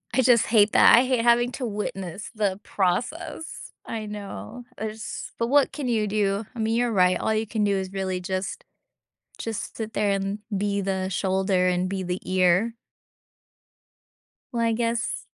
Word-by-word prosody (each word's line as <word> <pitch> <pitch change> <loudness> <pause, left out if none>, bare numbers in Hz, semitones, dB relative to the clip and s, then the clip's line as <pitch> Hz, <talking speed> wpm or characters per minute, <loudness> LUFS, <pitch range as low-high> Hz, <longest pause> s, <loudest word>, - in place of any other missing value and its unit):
I 260 - +5
just 245 -2 +5
hate 215 -2 +4
that, - - +8
I 240 +3 +5
hate 255 -2 +1
having 240 +1 +4
to 255 - -3
witness 200 -3 -4
the 200 -3 0
process. 275 - -2
I 220 -2 -4
know, 210 +4 -7
there's 215 -1 -5
but 230 - +1
what 285 +1 +4
can 285 -4 -4
you 220 -3 +1
do? 205 0 0
I - - -7
mean, 220 +1 +1
you're 240 0 +1
right, 185 -3 +3
all 220 - 0
you 220 0 -1
can 215 -1 -1
do 200 -1 +2
is 190 -1 -3
really 190 -1 -2
just 185 +1 -3 0.8
just 225 -2 -5
sit 220 -1 -5
there 205 -1 +1
and 195 +1 -1 0.2
be 200 0 0
the 190 -1 -1
shoulder 190 0 +1
and 180 0 +1
be 190 0 -3
the 180 +1 -3
ear. 185 +4 +3 1.8
Well, 235 -1 0
I 230 - +2
guess 230 0 -1
210 Hz, 170 wpm, -25 LUFS, 190-230 Hz, 1.8 s, that